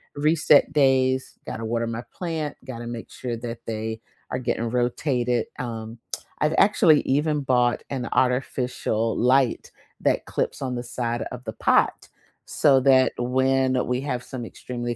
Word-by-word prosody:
reset 150 -1 +4
days, 130 -2 +2
gotta 115 0 -5
water 115 +1 -1
my 115 +1 -4
plant, 160 -4 -3
gotta 120 -3 -7
make 120 -1 -6
sure 120 -2 -4
that 115 0 -6
they 110 0 -4 0.3
are 125 - -1
getting 115 -1 -1
rotated, 125 0 0
um, 115 -1 -5 0.4
I've 150 0 +2
actually 180 -7 +5
even 150 +2 +1
bought 125 -2 +2
an 130 -4 -3
artificial 125 -3 0
light 130 0 +2 0.3
that - - +1
clips - - -2
on 130 -2 -2
the 120 - -4
side 120 0 -2
of 125 0 -7
the 110 - -4
pot, - - +2 0.4
so 135 -2 +5
that 130 -1 +4
when 130 +1 +2
we 125 +1 0
have 125 -3 -3
some 125 -1 -7
extremely 120 0 -5
125 Hz, 150 wpm, -24 LUFS, 120-135 Hz, 0.4 s, actually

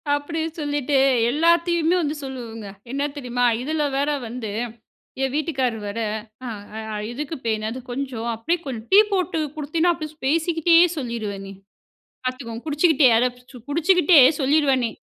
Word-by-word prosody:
அப்படின்னு 320 +2 -3
சொல்லிட்டு 290 -1 0 0.3
எல்லாத்தையுமே 335 +2 +3
வந்து 300 0 -2
சொல்லுவங்க 230 -5 -7 0.2
என்ன 280 +1 -1
தெரியுமா? 245 -2 -1 0.2
இதில 305 +3 -1
வேற 285 +2 +1 0.2
வந்து 225 -2 -5 0.7
என் 265 - -1
வீட்டுக்காரர் 265 -8 -1
வேற 215 +3 -4 0.5
அ 220 0 -6 0.2
எதுக்கு 300 +5 -5
பே 225 - +2 0.2
"அது 255 - -6
கொஞ்சம் 245 -3 -4
அப்படியே 330 +11 0
கொஞ்சம் 235 -4 -6
டீ 390 - +7
போட்டு 365 -4 0 0.2
குடுத்தினா 320 +3 +1
அப்படியே 310 -1 -7
பேசிக்கிட்டே 330 +2 +2 0.2
சொல்லிருவேன்னே." 210 -7 -5 0.7
பார்த்துக்கோங்க 245 -3 -5
குடிச்சுகிட்டே 300 -2 +4
அத 250 - +3 0.4
குடிச்சுகிட்டே 340 0 +5 0.2
சொல்லிருவேன்னே. 265 -5 +2
280 Hz, 125 wpm, -23 LUFS, 235-320 Hz, 0.7 s, டீ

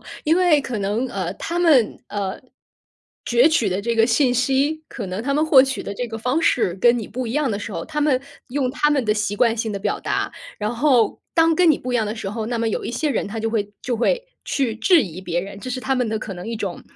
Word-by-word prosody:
哦， - - -23 0.2
因 320 +3 +3
为 350 -5 +4
可 250 -5 -4
能， 205 +5 -1
呃 185 -6 -3
他 340 +1 -4
们， 300 -10 +4
呃， 200 -2 -4 0.9
攫 240 +6 +5
取 275 -10 +2
的 185 +1 -1
这 230 +3 -1
个 225 0 +4
信 250 +2 +3
息， 275 +5 +1
可 225 -6 -6
能 185 +4 -4
他 280 +2 -1
们 305 - +2
获 275 -4 +7
取 270 -1 -2
的 - - -5
这 245 +4 -3
个 225 - -5
方 250 +7 0
式 230 - +2
跟 240 +5 +4
你 220 - -5
不 250 +3 -4
一 225 - -4
样 290 -2 +1
的 200 - -2
时 210 0 -6
候， 165 - -4
他 300 -1 -4
们 290 -4 +2 0.3
用 255 -1 -1
他 295 +1 +1
们 280 -4 +1
的 215 - +2
习 210 -1 -2
惯 235 -1 +3
性 225 -1 -2
的 200 - -3
表 - - -2
达。 - - -2 0.3
然 215 +3 -2
后， 245 -4 +2
当 330 0 +4
跟 340 0 +5
你 295 - +2
不 250 - -5
一 245 - +3
样 220 - 0
的 210 - -3
时 205 -4 -5
候， 220 +1 -4
那 235 -1 -2
么 230 - 0
有 220 - -3
一 - - -3
些 285 +5 -1
人 240 - -1
他 225 +2 -5
就 225 0 -1
会 205 -2 -1
就 245 -2 -1
会 - - 0 0.2
去 255 -6 -1
质 345 +6 +4
疑 185 -3 -7
别 175 -2 -2
人。 195 +2 -8
这 260 - -7
是 255 - -2
他 265 +1 0
们 250 -3 0
的 220 - -1
可 215 - -6
能 180 +2 -8
一 230 - -3
种， 200 -4 -5
235 Hz, 295 characters per minute, -21 LUFS, 210-280 Hz, 0.9 s, 获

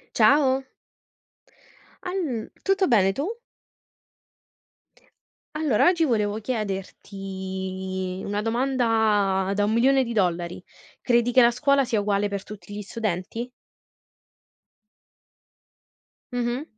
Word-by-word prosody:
Ciao. 270 -2 +4 1.4
All 330 - -3
tutto 390 -1 +2
bene, 195 -6 +4
tu? 305 - -3 2.2
Allora, 300 -8 +2
oggi 350 -2 +3
volevo 215 -5 0
chiederti, 190 -3 -5
una 205 +1 -2
domanda 220 -5 +1
da 205 - +1
$1.000.000: 220 -8 +1 0.4
credi 240 -1 +2
che 255 +1 +6
la 235 0 +5
scuola 275 +2 +2
sia 230 -4 0
uguale 205 0 0
per 200 -1 -4
tutti 205 0 -10
gli 210 - -5
studenti? 215 +2 -4 2.8
Mh-mh. 245 +3 -2
220 Hz, 85 wpm, -25 LUFS, 195-255 Hz, 2.8 s, che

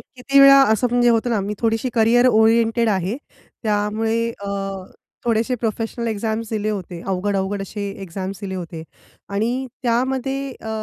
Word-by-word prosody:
किती 275 +2 -1
वेळा 275 0 +9
असं 220 +3 +2
म्हणजे 245 0 +3
होतं 235 +1 +2
ना 225 - +1
मी 200 +2 -3
थोडीशी 225 +2 0
करियर 235 +2 +4
ओरिएंटेड 225 0 +3
आहे. 190 +2 0 0.5
त्यामुळे 220 +2 0
अ, - - -4 0.8
थोडेसे 230 +2 +1
प्रोफेशनल 225 +1 -2
एक्झाम्स 220 +1 -2
दिले 215 -1 -1
होते. 185 -4 -5
अवघड 195 +1 -1
अवघड 195 +1 -2
असे 200 +1 -5
एक्झाम्स 190 +1 -6
दिले 195 -2 -5
होते. 170 -3 -6 0.5
आणि 235 +6 -1 0.2
त्यामध्ये 265 +3 -1
अ, - - -7
225 Hz, 150 wpm, -21 LUFS, 200-240 Hz, 0.8 s, वेळा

